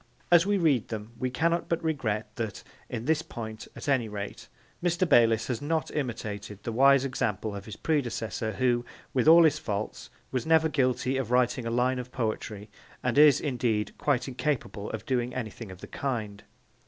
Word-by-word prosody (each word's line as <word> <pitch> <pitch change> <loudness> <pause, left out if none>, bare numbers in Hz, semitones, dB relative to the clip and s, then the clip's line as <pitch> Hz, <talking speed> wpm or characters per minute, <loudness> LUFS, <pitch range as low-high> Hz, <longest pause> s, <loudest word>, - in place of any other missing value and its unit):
As 175 +1 +6
we 205 0 +3
read 150 - +2
them 110 0 -6
we 130 - 0
cannot 165 +6 0
but 170 0 0
regret 110 -9 -2
that, 110 -5 -4 0.3
in 120 -1 -4
this 160 +1 +2
point 110 -6 -7
at - - -8
any 130 -6 +2
rate, 100 -1 -6 0.4
Mr. 175 +1 +2
Bayliss 115 -6 +5
has 125 -3 -3
not 160 +2 -1
imitated 105 -7 -4
the 115 - -3
wise 135 +3 +5
example 110 -5 -2
of 100 0 -7
his 110 - -7
predecessor 115 - -1
who, 120 -2 +1 0.3
with 130 +2 +1
all 165 +1 +9
his 155 -1 +3
faults, 105 -4 -4 0.2
was 130 -2 -1
never 160 0 +4
guilty 130 -2 +1
of 130 -4 -2
writing 125 -1 +2
a - - -1
line 125 +2 +1
of 125 0 -7
poetry, 110 -3 -3 0.4
and 125 -2 0
is, 150 -3 +7
indeed, 120 -7 -1
quite 140 -3 +1
incapable 130 -6 -2
of 110 0 -6
doing 125 -1 -1
anything 115 -3 -5
of 95 0 -11
the - - -8
kind. 110 -7 -4
125 Hz, 180 wpm, -28 LUFS, 110-145 Hz, 0.4 s, all